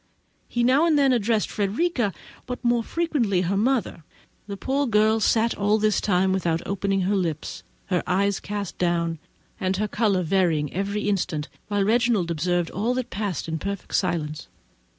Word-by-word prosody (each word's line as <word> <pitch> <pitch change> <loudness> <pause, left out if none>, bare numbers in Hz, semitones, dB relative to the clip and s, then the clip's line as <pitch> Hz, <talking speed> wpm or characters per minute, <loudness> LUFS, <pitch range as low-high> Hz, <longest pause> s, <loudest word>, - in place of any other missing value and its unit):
He 240 - -1
now 270 +7 +4
and 315 -3 +3
then 275 -2 +4
addressed 225 -2 +1
Frederica, 225 - 0 0.4
but 250 0 -5
more 240 0 +3
frequently 250 - 0
her 185 +2 0
mother. 225 -5 0 0.4
The 200 -1 -5
poor 275 +7 0
girl 220 0 +3
sat 225 +1 +2
all 205 +1 +2
this 215 -1 +1
time 190 -1 +2
without 170 -3 0
opening 195 0 0
her 195 +3 +1
lips—her 175 +1 -3
eyes 200 +1 +1
cast 205 -2 -5
down, 170 -2 0 0.4
and 185 0 0
her 210 +1 0
colour 205 -4 +1
varying 160 -5 +1
every 200 +3 -2
instant; 175 -6 -1 0.2
while 205 -1 +1
Reginald 225 -5 +2
observed 175 +1 0
all 225 +6 -1
that 255 -1 -3
passed 200 -6 -3
in 160 0 -3
perfect 200 +1 -5
silence. 155 -2 -1
200 Hz, 160 wpm, -24 LUFS, 180-230 Hz, 0.4 s, now